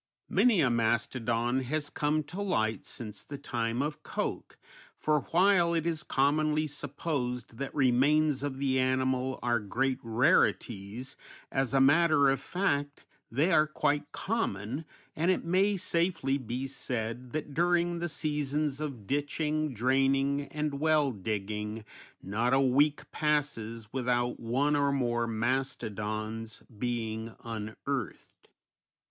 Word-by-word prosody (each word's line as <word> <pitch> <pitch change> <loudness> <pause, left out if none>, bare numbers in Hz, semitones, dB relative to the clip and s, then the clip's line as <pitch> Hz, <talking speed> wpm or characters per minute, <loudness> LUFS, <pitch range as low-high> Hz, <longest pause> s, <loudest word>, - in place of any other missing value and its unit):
Many 230 -8 +4
a 130 -4 +3
mastodon 120 +1 +1
has 145 +3 -2
come 150 +1 0
to 175 +7 -6
light 110 - 0
since 105 -4 -7
the 145 - -7
time 120 0 -2
of 150 +1 -4
Koch, - - -4 0.4
for 155 -1 +2
while 175 -1 +4
it 165 -1 0
is 165 -2 0
commonly 150 +3 +2
supposed 135 -5 -4
that 140 -1 -4
remains 145 +2 +3
of 140 -2 -3
the 135 -1 +1
animal 130 0 +1
are 120 -1 +2
great 130 +5 -1
rarities, 115 - +1 0.3
as 135 -1 0
a - - +5
matter 145 0 +5
of 135 - 0
fact 145 -3 -1 0.3
they 145 +10 +2
are 155 -2 +5
quite 150 -1 0
common, 145 - -2 0.3
and 170 +4 +1
it 185 - +1
may 195 +4 +2
safely 170 -6 0
be 125 +1 -4
said 125 -2 -3
that 150 -2 -4
during 175 +1 +2
the 175 0 -2
seasons 150 -2 -1
of 135 -9 -5
ditching, 150 +3 -1
draining, 135 +3 +2
and 150 -1 -3
well 155 -2 +3
digging 105 +1 -4 0.4
not 115 +6 +1
a - - +4
week 140 +3 +2
passes 115 -8 -1
without 120 -1 0
one 135 +6 +1
or 140 -1 +2
more 120 -3 0
mastodons 110 -2 -3
being 115 -1 -3
unearthed. 115 +3 -5
135 Hz, 130 wpm, -30 LUFS, 120-150 Hz, 0.4 s, a